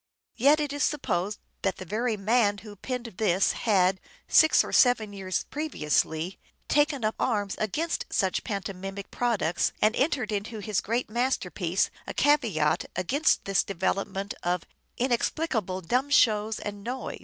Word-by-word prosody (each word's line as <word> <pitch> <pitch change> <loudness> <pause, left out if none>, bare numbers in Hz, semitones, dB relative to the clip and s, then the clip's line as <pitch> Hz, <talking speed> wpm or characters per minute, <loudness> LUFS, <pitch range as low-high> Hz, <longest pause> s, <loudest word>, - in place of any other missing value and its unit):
Yet 285 +5 +4
it 295 -2 -2
is 290 - -4
supposed 205 - -1 0.2
that 195 -2 0
the 185 - -8
very 220 +4 -1
man 205 0 +2
who 205 +1 -11
penned 250 +4 -5
all 230 - -11
this 195 -3 +2
had, 190 -4 +2 0.3
six 315 - +6
or - - -7
seven 235 -6 +4
years 190 -2 -2
previously, 170 - -1 0.3
taken 290 -4 +2
up 215 - +1
arms 205 -5 0
against 310 - -2
such 190 -1 0
pantomimic 195 -1 -5
products 220 -9 0
and 215 +1 +3
entered 265 -6 0
into 210 +2 -3
his 210 -2 -1
great 235 +4 -1
masterpiece 195 - 0 0.2
a - - -5
caveat 225 - +2
against 270 - +1
this 195 -1 +2
develop 195 +1 -1
ment 195 0 -5
of 175 0 -1 0.2
" - - -46
inexplicable 240 - -1
dumb 250 - 0
shows 220 -5 +3
and 205 -1 -6
noise." 250 +4 -5
210 Hz, 155 wpm, -27 LUFS, 190-250 Hz, 0.3 s, six